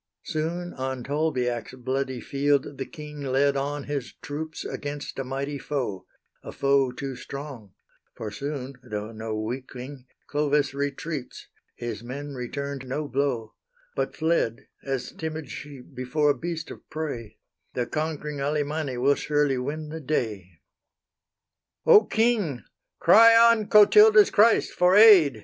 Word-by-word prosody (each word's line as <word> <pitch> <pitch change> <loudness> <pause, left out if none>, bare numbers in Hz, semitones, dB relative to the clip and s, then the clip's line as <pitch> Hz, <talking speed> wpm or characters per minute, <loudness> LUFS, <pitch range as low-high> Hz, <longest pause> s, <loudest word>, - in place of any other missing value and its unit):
Soon 170 +2 -3
on 130 -1 -4
Tolbiac's 130 -4 -1
bloody 130 0 -2
field 140 +1 0
the 135 - -3
king 150 -1 -9
Led 140 +1 +2
on 140 +1 -2
his 140 -3 -4
troops 155 +2 -6
against 145 -1 -5
a - - -1
mighty 135 +2 -4
foe; 125 -12 -4 0.3
A - - -8
foe 140 -2 +2
too 135 +1 -5
strong; 135 -9 -9 0.4
for 110 -2 -6
soon, 135 +3 -5
though 110 -3 -5
no 110 -1 -4
weakling, 130 +3 -6 0.2
Clovis 145 -1 +1
retreats 140 0 -5 0.3
his 120 -1 -5
men 140 +4 -6
returned 135 +1 -5
no 145 +4 -3
blow; 130 -5 -1 0.4
But - - -2
fled 160 -8 0 0.2
as 135 -2 -3
timid 160 -4 -6
sheep 140 -2 -10
before 130 +4 +1
a - - -2
beast 165 -1 -5
of - - -10
prey; 140 -9 -5 0.4
The 125 - 0
conquering 150 -1 -3
Alemanni 145 -1 -1
will 135 +3 +4
surely 145 -2 0
win 150 +4 -4
the 160 +1 -6
day. 105 - -3 1.2
"O 210 - +7
king! 220 - +1 0.3
cry 230 +6 +7
on 230 -2 +5
Clotilda's 210 0 +7
Christ 225 +3 +4
for 180 +1 +3
aid!" 195 - +8
140 Hz, 135 wpm, -26 LUFS, 130-155 Hz, 1.2 s, aid